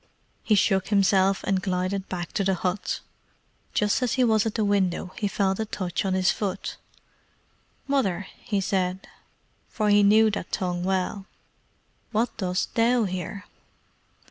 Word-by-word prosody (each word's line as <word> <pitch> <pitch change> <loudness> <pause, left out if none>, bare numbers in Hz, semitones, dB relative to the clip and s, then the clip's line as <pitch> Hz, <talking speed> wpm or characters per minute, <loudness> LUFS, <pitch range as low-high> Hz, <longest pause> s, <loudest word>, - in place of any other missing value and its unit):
He 215 - +2
shook 190 -1 +2
himself 195 -1 +3
and 195 -1 0
glided 185 +1 -2
back 175 -2 -4
to 200 - 0
the 190 0 +2
hut. 185 +2 -2 0.7
Just 210 +4 +2
as 250 -1 +1
he 255 -1 +2
was 220 -2 +3
at 220 - -4
the 220 - +1
window 190 -2 0
he 210 - 0
felt 195 0 0
a 220 - 0
touch 185 -3 -3
on 190 -1 +1
his 185 0 +3
foot. 195 -2 -4 1.1
"Mother," 205 -10 0 0.3
said 185 -1 0
he, - - -17 0.6
for 215 -1 0
he 205 0 +6
knew 215 +2 +5
that 205 - -5
tongue 180 -1 -2
well, 190 +1 -1 0.8
"what 230 +2 0
dost 185 -2 -2
THOU 235 +1 +3
here?" 185 +1 -4
195 Hz, 150 wpm, -25 LUFS, 185-210 Hz, 1.1 s, he